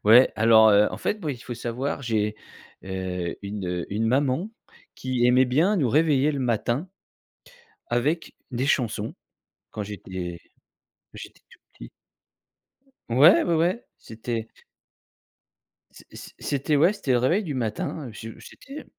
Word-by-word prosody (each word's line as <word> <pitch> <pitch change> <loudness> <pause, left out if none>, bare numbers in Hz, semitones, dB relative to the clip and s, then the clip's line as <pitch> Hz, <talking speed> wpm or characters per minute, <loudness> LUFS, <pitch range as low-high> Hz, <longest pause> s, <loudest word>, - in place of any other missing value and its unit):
Ouais, 115 +5 +7
alors, 110 0 +6
heu, 105 0 +5
en - - -5
fait, 210 - -2
moi, 155 - -1
il 125 - -9
faut 120 - -6
savoir, 120 +5 -3
j'ai, 110 -4 0 0.5
heu, 95 -2 -4
une, 100 -1 -5
heu, 90 -1 -3
une 110 +2 0
maman 135 - +1 0.5
qui 130 -2 0
aimait 125 +1 +5
bien 160 +12 +2
nous 140 -9 +1
réveiller 150 +1 +3
le 140 - -3
matin 120 - -1 1.0
avec 145 +8 -1 0.2
des 125 +1 -1
chansons 115 -6 0 0.6
quand 105 - -5
j'étais 95 -4 -6 0.7
quand - - -17
j'étais - - -11
tout - - -19
petit. - - -11 1.2
Ouais, 140 +10 +6
ouais, 170 - +1
ouais, 175 +8 0
c'était 115 0 -5 1.4
c - - -18 0.2
c - - -11
c'était 145 +2 -1
ouais, 165 +8 +4
c'était 145 -10 -3
le 125 - +4
réveil 170 - +2
du 155 -6 -4
matin, 125 +3 -3
je 110 +1 -8
j'étais 285 +2 -11
125 Hz, 145 wpm, -25 LUFS, 110-145 Hz, 1.4 s, Ouais